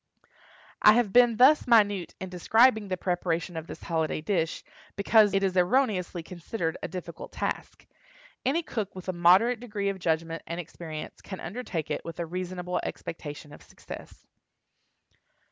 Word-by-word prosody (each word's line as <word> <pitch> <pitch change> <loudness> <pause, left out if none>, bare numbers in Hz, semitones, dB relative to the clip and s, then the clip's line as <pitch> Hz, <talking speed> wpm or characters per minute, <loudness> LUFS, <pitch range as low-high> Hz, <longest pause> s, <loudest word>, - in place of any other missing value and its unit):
I 210 - +8
have 230 -4 +1
been 240 -2 +6
thus 275 +5 +6
minute 205 -6 +3
in 190 - -6
describing 220 +4 +3
the 185 -1 -2
preparation 175 -1 -2
of 160 0 -5
this - - -9
holiday 160 -2 -1
dish, 165 0 -1 0.3
because 210 +1 +5
it 195 +1 +1
is 190 -1 0
erroneously 185 -3 +1
considered 170 0 -4
a - - -3
difficult 180 -1 -8
task. - - -4 0.6
Any 310 +7 +1
cook 215 -10 -4
with 185 0 -7
a - - 0
moderate 185 +8 +5
degree 210 -4 -3
of 195 -1 -4
judgment 165 -1 -1
and 170 +1 -4
experience 160 -2 -8
can 190 - -8
undertake 175 - -5
it - - -2
with 165 0 -8
a 170 - -1
reasonable 180 +1 -3
expectation 150 -2 -7
of - - -13
success. - - -12
185 Hz, 155 wpm, -28 LUFS, 170-215 Hz, 0.6 s, I